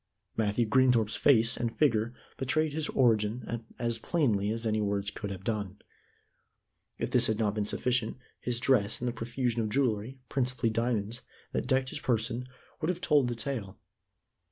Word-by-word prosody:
Matthew 110 +1 +1
Greenthorpe's 120 -2 +3
face 115 -4 +4
and 120 -1 -3
figure 115 -6 +2 0.2
betrayed 150 +3 0
his 155 0 -1
origin 115 -1 +1
as 115 -1 -1
plainly 110 - +1
as 115 +1 -3
any 110 -1 +1
words 100 -1 -1
could 100 0 -5
have 95 -1 -6
done. 100 -2 -3 1.2
If - - -3
this 120 -1 +5
had 110 - 0
not 105 -2 +1
been 105 -1 -1
sufficient, 125 +1 0 0.2
his 120 -1 0
dress 115 -5 +3
and 125 - -2
the - - +1
profusion 120 0 -1
of 110 - -1
jewelry 120 0 0
principally 125 -3 0
diamonds 115 0 -1 0.3
that - - -2
decked 130 -1 +2
his - - -4
person 120 +1 0 0.3
would 155 - 0
have 180 -1 -1
told 150 -7 +3
the 120 - -2
tale. 115 -6 -4
115 Hz, 165 wpm, -30 LUFS, 110-130 Hz, 1.2 s, this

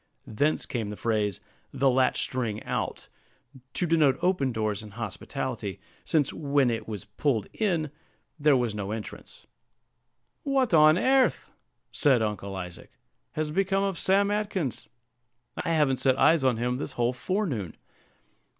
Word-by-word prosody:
Thence 145 +8 0
came 115 -4 -3
the 105 - -5
phrase, 105 -4 0 0.3
"the 140 - +1
latch 130 0 +3
string 115 -5 -3
out," - - -3 0.7
to 180 - +1
denote 155 -5 +3
open 180 -8 +2
doors 110 -3 -1
and 105 -2 -11
hospitality; 115 -1 -5 0.2
since, 150 -4 +1
when 140 -4 +2
it 110 -1 -4
was 105 -1 -6
pulled 110 +1 -1
in 170 -9 0 0.5
there 145 -2 +5
was 120 -4 0
no 100 -2 -4
entrance. 110 0 -8 1.0
"What 270 - +1
on 155 0 +7
airth," 260 +5 +2 0.4
said 130 -6 +3
Uncle 100 -2 -3
Isaac, 90 -2 -7 0.4
"has 155 -1 -2
become 195 +3 +1
of 195 -3 -1
Sam 200 +2 +3
Atkins? 200 - -2 0.8
I - - -2
haven't 150 -5 +2
set 130 +1 +2
eyes 160 -2 +4
on 130 -3 +2
him 125 +2 -1
this 140 - -5
whole 120 +1 0
forenoon." 130 - -2
130 Hz, 140 wpm, -27 LUFS, 110-165 Hz, 1.0 s, on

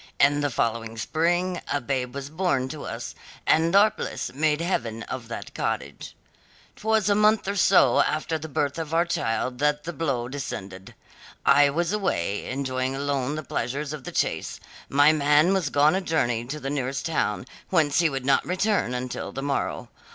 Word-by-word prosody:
In 145 +1 +4
the 145 - +1
following 115 -2 -2
spring 175 - 0
a 145 - +1
babe 130 -1 -3
was 140 +1 -6
born 155 -6 0
to 155 0 -7
us, 115 0 -6 0.3
and 165 +3 +3
our 210 +2 +6
bliss - - -5
made 150 +2 +1
heaven 115 -10 -2
of 125 -3 -6
that 115 - -7
cottage. - - -4 0.6
"Twas 220 -1 +1
a 205 - +4
month 210 0 +3
or 200 - -1
so 190 0 +5
after 155 +1 -1
the 160 +1 -7
birth 145 +2 -1
of 160 0 -3
our 170 +1 +3
child 125 -5 -2
that 150 0 +1
the 175 +2 -5
blow 135 -8 -1
descended. 100 -9 -7 0.5
I 145 +1 +6
was 170 +6 -1
away, 105 - -1
enjoying 130 0 -2
alone 140 0 -1
the 155 - -4
pleasures 140 +3 -3
of 150 -3 -7
the - - -6
chase; - - -1 0.3
my 145 +3 +5
man 150 +4 +4
was 185 -6 0
gone 145 +2 +4
a 190 - 0
journey 120 -10 0
to 150 +5 -5
the 135 -1 -4
nearest 135 -1 -2
town, 140 -8 -1 0.2
whence 155 -5 +2
he 170 -2 +4
would 135 -2 -4
not 135 - +3
return 185 - 0
until 125 0 -4
the 135 - -5
morrow. 140 -1 -2
145 Hz, 180 wpm, -25 LUFS, 130-165 Hz, 0.6 s, our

